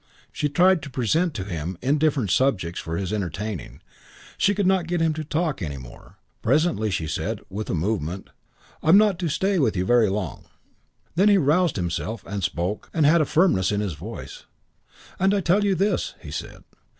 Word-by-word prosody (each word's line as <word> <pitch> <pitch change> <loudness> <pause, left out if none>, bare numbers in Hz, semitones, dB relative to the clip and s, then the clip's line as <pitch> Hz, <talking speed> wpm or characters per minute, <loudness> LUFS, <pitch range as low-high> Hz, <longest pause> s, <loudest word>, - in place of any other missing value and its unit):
She 150 - -1
tried 180 +4 +4
to 145 - -8
present 140 - 0
to 95 - -3
him 85 -2 -5
indifferent 140 - +1
subjects 95 -11 +1
for 80 +1 -4
his 95 +2 -3
entertainment. 100 0 -4 0.5
She 205 0 +2
could 200 -1 0
not 185 -3 +2
get 175 0 -1
him 160 -1 +2
to 155 0 -4
talk 155 -3 -1
any 75 -5 -4
more. 60 -2 -13 0.2
Presently 140 -3 +2
she 85 -5 -2
said, 75 - -3
with 105 +3 -5
a - - 0
movement, 95 0 -2 0.5
"I 155 - -1
am 185 - +8
not 205 -4 +3
to 175 -3 -1
stay 190 +5 +1
with 115 - +1
you 90 - 0
very 120 -1 +4
long." 95 -4 -4 0.7
He 180 - +3
then 210 - +6
aroused 180 -3 +3
himself 95 +5 -3
and 100 -1 -4
spoke 90 +4 -2
and 160 -3 +3
had 160 +3 +5
a - - +2
firmness 155 - +2
in 105 - 0
his 100 -4 -2
voice. 95 +11 -9 0.7
"And 195 +2 +3
I'll 200 - +1
tell 190 +5 +3
you 200 -2 +2
this," 200 +4 0
he - - -10
said. - - -7
130 Hz, 195 wpm, -24 LUFS, -, 0.7 s, am